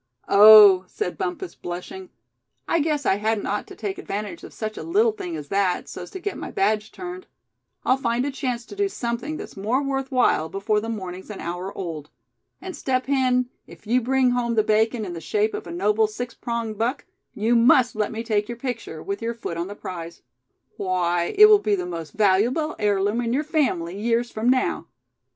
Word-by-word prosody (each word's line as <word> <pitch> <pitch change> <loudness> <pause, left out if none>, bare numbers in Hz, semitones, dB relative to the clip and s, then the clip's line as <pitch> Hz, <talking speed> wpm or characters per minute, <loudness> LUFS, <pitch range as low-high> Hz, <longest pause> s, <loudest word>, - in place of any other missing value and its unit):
"Oh!" 205 -2 +9
said 430 - -4
Bumpus, 370 -1 -4
blushing, 270 - -7 0.6
"I 335 - +2
guess 300 -2 0
I 190 - +3
hadn't 215 0 -1
ought 205 +1 -2
to - - -11
take 205 -3 -4
advantage 200 -4 -5
of - - -10
such 215 -1 -5
a - - -6
little 425 +7 +2
thing 180 - -6
as 150 -2 -7
that, 195 -2 0
so's - - -8
to 380 - -7
get 400 +2 -4
my - - -6
badge 215 - 0
turned. 365 0 -8 0.6
I'll 255 - +3
find 240 -1 0
a 285 - -2
chance 250 -3 -3
to 405 - -11
do 400 0 0
something 245 +3 -4
that's - - -9
more 225 +8 0
worth 270 0 -2
while, 240 -11 +2
before 200 +4 0
the 225 +2 -5
morning's 190 -4 -6
an 210 - -7
hour 175 +3 -4
old. 160 -5 -5 0.5
And 370 -1 -7
Step 255 -1 -1
Hen, 255 -2 +1 0.2
if - - -15
you 245 +4 +2
bring 260 +1 +2
home 240 -1 0
the 215 - +3
bacon 220 +1 +1
in 180 - -6
the 165 - -7
shape 210 +6 0
of - - -6
a - - -7
noble 210 +5 +2
six 235 +3 -6
pronged 230 -3 -4
buck, 245 +5 -1 0.3
you 225 +3 +1
must 245 0 +5
let 210 -1 -1
me 225 0 -4
take 210 -2 0
your 240 - -5
picture, 240 - -5
with 200 +1 -4
your 230 +1 -2
foot 225 -7 -5
on 170 +1 -3
the 205 - -8
prize. 170 -4 -8 0.5
Why, 175 -3 0
it 425 - +10
will 425 -1 +7
be 210 - +1
the 180 -2 -3
most 165 -4 -6
valuable 220 +10 +2
heirloom 205 +2 +1
in 235 0 -1
your 285 +4 +1
family, 200 - -1
years 235 +1 0
from 220 +3 0
now. 255 0 +1
225 Hz, 205 wpm, -23 LUFS, 195-255 Hz, 0.6 s, it